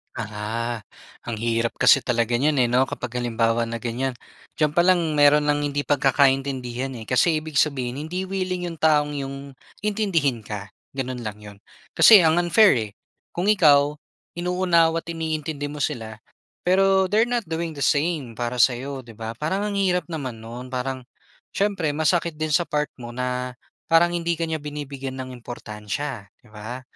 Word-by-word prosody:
Ah 115 -2 -4
ha, 105 0 -5 0.8
ang 115 - -2
hirap 115 +1 -1
kasi 135 - +6
talaga 120 -1 0
niyan 150 +3 +2
eh 120 - +3
'no, 130 +2 +3
kapag 125 0 -5
halimbawa 115 -1 0
na 115 - -4
ganiyan. 125 +2 -2 0.4
Diyan 150 -2 +1
pa 175 - +3
lang 170 -5 +2
meron 145 +1 +6
ng 145 0 +1
hindi 145 0 -1
pagkakaintindihan 135 -3 +1
eh, 115 - -7
kasi 155 +5 +3
ibig 155 -3 -1
sabihin 130 -4 0
hindi 180 +3 -3
willing 185 -1 -3
'yong 165 -2 -9
taong 150 -2 +3
'yong 135 0 -4 0.5
intindihin 170 - 0
ka, 100 -1 -6 0.3
gano'n 130 -2 -3
lang 105 -2 -5
'yon. 105 -1 -11 0.4
Kasi 215 -4 +9
ang 160 +2 +4
unfair 195 +4 +5 0.2
eh. - - -21 0.4
Kung 175 - -1
ikaw, 145 -7 +5 0.4
inuunawa't 175 -2 +2
iniintindi 155 -2 -3
mo 150 - -7
sila, 110 -7 -4 0.5
pero 190 +1 +4
they're 220 +3 +3
not 240 -3 -1
doing 160 0 -4
the 140 - -2
same 145 -5 0
para 120 +2 -3
sa'yo 130 +3 +1
'di 115 - -12
ba. 115 +1 -6
Parang 190 +8 -1
ang 200 - -4
hirap 180 -2 +1
naman 135 -8 -5
no'n 120 +3 -8
parang 130 0 -3 0.5
siyempre 195 -6 0
masakit 165 +2 +1
din 155 0 -3
sa 175 - +4
part 150 -2 -1
mo 120 -2 -8
na 125 0 -3 0.3
parang 165 +1 +5
hindi 170 0 0
ka 165 - -3
niya 160 - -1
binibigyan 140 -3 -6
ng 130 - -7
importansya 115 +1 -6 0.2
'di - - -22
ba? 110 +4 -7
145 Hz, 170 wpm, -23 LUFS, 120-165 Hz, 0.8 s, Kasi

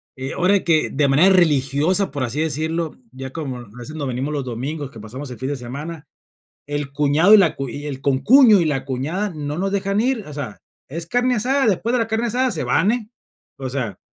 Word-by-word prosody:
Eh, 130 +1 -5
ahora 190 +2 +2
que 160 -2 +2
de 140 0 +1
manera 175 +8 +5
religiosa, 155 +3 +2
por 140 -2 -3
así 130 +4 -3
decirlo, 160 +1 -1 0.2
ya 130 +1 -8
como, 140 -5 -5
a 120 - -11
veces 135 +6 -8
nos 145 -3 -3
venimos 130 +4 -3
los 145 -2 -2
domingos, 135 +4 -4
que 115 - -12
pasamos 130 +7 -8
el 120 - -8
fin 130 +1 -3
de 145 - -1
semana. 145 +6 -7 0.6
El 145 -1 -4
cuñado 150 +7 +3
y 215 - +9
la 175 -6 +3
cu 135 -1 -4
y 145 +4 -6
el 135 -2 -6
concuño 210 - +6
y 165 - +1
la 135 -3 -1
cuñada, 150 +11 -2
no 150 0 -4
nos 195 +1 -1
dejan 200 +1 0
ir, 245 -2 0
o 150 - -9
sea, 135 -8 -6 0.3
es 165 +4 -5
carne 245 +4 +1
asada, 265 +5 +1
después 220 +3 +1
de - - +3
la 230 - 0
carne 225 +2 -1
asada, 250 +3 +1
se - - -3
van, 200 - +2
eh. 235 -3 -3 0.5
O 135 -1 -4
sea, 115 -8 -3
150 Hz, 225 wpm, -21 LUFS, 135-195 Hz, 0.6 s, y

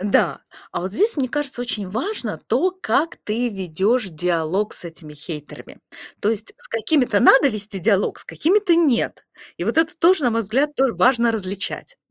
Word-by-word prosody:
Да, 200 +1 +1 0.3
а - - -3
вот 190 +2 -4
здесь, 425 - +1
мне 260 -3 0
кажется, 285 -2 -3
очень 210 -6 -3
важно 365 - -3
то, 370 - +2
как 330 -3 -1
ты 235 +3 -1
ведешь 195 +4 0
диалог 175 +4 -1
с - - -5
этими 160 -2 -10
хейтерами. 150 0 -9 0.4
То 210 - +2
есть 220 -1 -4
с - - -18
какими-то 225 -1 +1
надо 270 +4 +6
вести 205 -3 -5
диалог, 200 0 +1
с - - -8
какими-то- 365 +2 +2
нет. 295 -8 +1 0.3
И - - -4
вот - - -1
это 325 +2 +2
тоже, 345 0 +4
на 245 - +3
мой 230 0 0
взгляд, 270 +9 0
тоже 265 -3 +2
важно 235 -2 +3
различать. 200 - -4
230 Hz, 180 wpm, -21 LUFS, 195-290 Hz, 0.4 s, надо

